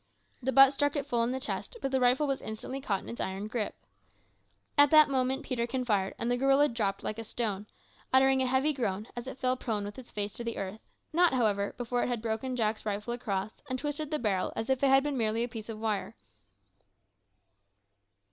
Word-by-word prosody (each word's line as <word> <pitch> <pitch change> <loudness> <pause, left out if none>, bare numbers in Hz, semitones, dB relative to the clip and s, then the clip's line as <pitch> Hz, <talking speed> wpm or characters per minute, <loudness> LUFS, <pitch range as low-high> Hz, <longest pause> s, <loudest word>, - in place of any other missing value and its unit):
The 265 +1 0
butt 270 +1 +8
struck 290 +1 +1
it 285 -2 -1
full 240 -4 0
in 235 - 0
the 260 - -2
chest, 290 - -4
but 270 - -2
the 265 - +2
rifle 250 +4 +3
was 275 -2 -1
instantly 235 +5 -5
caught 200 -7 -1
in - - -9
its 235 - -5
iron 190 +2 -3
gripe. 215 -1 -3 1.0
At 290 -1 +7
that 305 -1 +7
moment 265 +1 +1
Peterkin 250 0 -2
fired, 195 -4 0
and 235 +1 -1
the 245 - +2
gorilla 275 +3 +4
dropped 205 -4 -2
like 215 - -3
a - - -4
stone, 210 -3 -3 0.4
uttering 265 0 +5
a 260 - +1
heavy 265 +4 +2
groan 210 -6 -2
as 240 +1 -6
it 265 - -6
fell 255 -1 +1
prone 220 -5 -2
with 205 +5 -7
its 250 - -12
face 205 0 -2
to 235 - -6
the 230 -1 -4
earth 195 +2 -5 0.3
not, 345 -2 +4
however, 205 -5 +1
before 245 0 -1
it - - 0
had 245 -2 -1
broken 230 +3 -2
Jack's 215 -2 0
rifle 210 +2 -2
across, 215 -3 -3
and 255 - -1
twisted 295 +2 -3
the 305 - 0
barrel 205 -8 0
as 225 +4 -2
if 265 - +1
it 275 - +5
had 270 0 +6
been 290 -3 -2
merely 225 +1 +1
a - - -1
piece 225 -2 -8
of 220 - -5
wire! 215 -2 -2
245 Hz, 220 wpm, -30 LUFS, 215-265 Hz, 1.0 s, butt